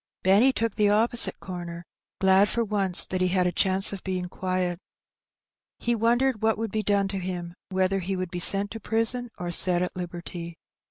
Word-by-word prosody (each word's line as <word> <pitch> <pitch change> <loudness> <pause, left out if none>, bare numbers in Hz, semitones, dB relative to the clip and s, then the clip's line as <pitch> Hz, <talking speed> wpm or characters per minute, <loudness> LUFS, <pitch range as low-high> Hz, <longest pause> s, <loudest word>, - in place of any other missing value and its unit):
Benny 205 +8 +5
took 230 -4 -2
the 210 -1 +3
opposite 230 +3 +2
corner^ 175 -2 -7 0.4
glad 190 +1 +4
for 235 - 0
once 195 -4 +1
that 185 0 -3
he 185 - +2
had 180 0 +1
a 180 - +1
chance 190 +3 +4
of 195 - -8
being 185 -1 -3
qoiet. 185 -2 -2 1.0
He 240 - -1
wondered 235 +1 +1
what 220 0 +1
wonld 225 -1 -4
be 215 - -1
done 200 -2 +1
to 195 -1 -3
him^ 175 -2 -5 0.2
whether 190 0 0
he 190 +1 -3
would 185 -2 -4
be 180 - -4
sent 200 +3 +3
to 225 - -6
prison 225 +3 -1
or 175 -1 -4
set 175 +1 +4
at 180 - -5
liberty. 175 -1 -7
190 Hz, 195 wpm, -25 LUFS, 180-215 Hz, 1.0 s, Benny